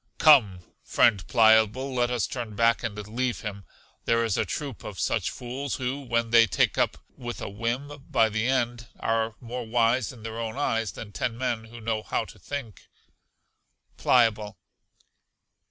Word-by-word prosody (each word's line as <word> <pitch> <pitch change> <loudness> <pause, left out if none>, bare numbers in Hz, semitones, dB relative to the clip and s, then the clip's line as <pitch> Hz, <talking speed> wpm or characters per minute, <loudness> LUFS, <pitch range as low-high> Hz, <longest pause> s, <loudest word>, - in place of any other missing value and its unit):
Come, 110 - +6 0.2
friend 100 -7 +3
Pliable, 110 +4 +4
let 120 -1 +1
us 125 -2 0
turn 115 -4 -5
back 115 +2 +3
and 110 -3 -4
leave 120 +2 -2
him; 100 -3 -6 0.4
there 115 0 +2
is 110 -4 0
a - - 0
troop 140 -6 -5
of 100 -3 -7
such - - 0
fools 130 +3 -5
who, 130 +1 -3
when 115 -3 -1
they 115 -1 +7
take - - +1
up - - +1 0.2
with 120 -1 -6
a - - -5
whim 130 +7 -4
by 110 - +4
the 110 +2 -1
end, 120 -2 0
are 115 -1 0
more 120 0 -6
wise 115 +1 +2
in 115 -4 -14
their 115 0 -5
own 115 +2 -4
eyes 115 -6 0
than 105 - -9
ten 115 +3 -3
men 120 -3 -2
who 120 +1 -11
know 110 -1 -2
how - - -2
to - - -14
think. 135 -7 -7 1.1
Pliable. 110 -4 +2
115 Hz, 170 wpm, -26 LUFS, 110-125 Hz, 1.1 s, they